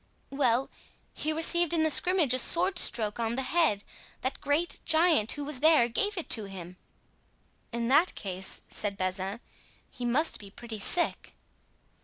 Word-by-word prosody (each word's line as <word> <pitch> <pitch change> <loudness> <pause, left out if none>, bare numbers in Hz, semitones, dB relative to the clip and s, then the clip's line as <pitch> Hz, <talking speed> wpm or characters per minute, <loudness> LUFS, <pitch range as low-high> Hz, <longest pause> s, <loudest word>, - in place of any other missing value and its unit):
"Well, 265 -2 +1 0.4
he 310 - -2
received 335 +1 +1
in 325 -2 +2
the 315 - +2
scrimmage 350 -6 +3
a 255 - +2
sword 360 +8 +2
stroke 215 -1 0
on 230 0 -1
the 265 - -1
head. 300 -10 +1 0.4
That 260 +1 -3
great 295 +5 0
giant 320 -8 +3
who 290 - -5
was 290 -3 -3
there 310 -5 +5
gave 410 - -1
it 345 - -3
to 220 -3 +2
him." 180 -2 -9 0.9
"In 235 0 -2
that 315 +7 +4
case," 190 -1 -5
said 200 -2 -2
Bazin, 190 +3 -3 0.5
"he 250 - -8
must 260 +7 +1
be 200 - -11
pretty 220 +1 -9
sick." 345 - 0
260 Hz, 160 wpm, -29 LUFS, 215-320 Hz, 0.9 s, there